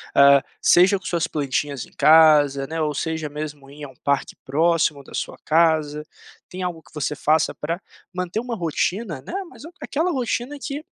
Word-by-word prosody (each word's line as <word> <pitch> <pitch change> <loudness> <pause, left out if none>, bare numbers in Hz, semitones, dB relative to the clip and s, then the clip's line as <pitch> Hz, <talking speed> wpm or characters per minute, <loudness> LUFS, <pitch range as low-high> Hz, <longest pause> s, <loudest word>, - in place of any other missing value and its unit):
Hã, 140 0 +7 0.2
seja 185 +3 +5
com 185 - -19
suas 170 -2 0
plantinhas 140 -2 -2
em - - -21
casa, 150 -2 +5
né, 160 +2 -3
ou 150 -1 0
seja 160 +1 -3
mesmo 145 -2 -7
ir 145 +1 -9
a 140 - -10
um 130 - -17
parque 140 -1 0
próximo 155 0 +1
da 135 - -16
sua - - -4
casa, 155 -2 +2 0.5
tem 185 - -7
algo 175 -3 -4
que - - -22
você 150 0 -2
faça 155 +2 +1
para 165 +5 -4 0.3
manter 180 +3 -3
um 245 0 -5
rotina, 175 - -2
né, - - -9
mas - - -15 0.2
aquela 325 +5 -1
rotina 260 0 -2
que, 285 +3 -5
155 Hz, 180 wpm, -22 LUFS, 145-180 Hz, 0.5 s, Hã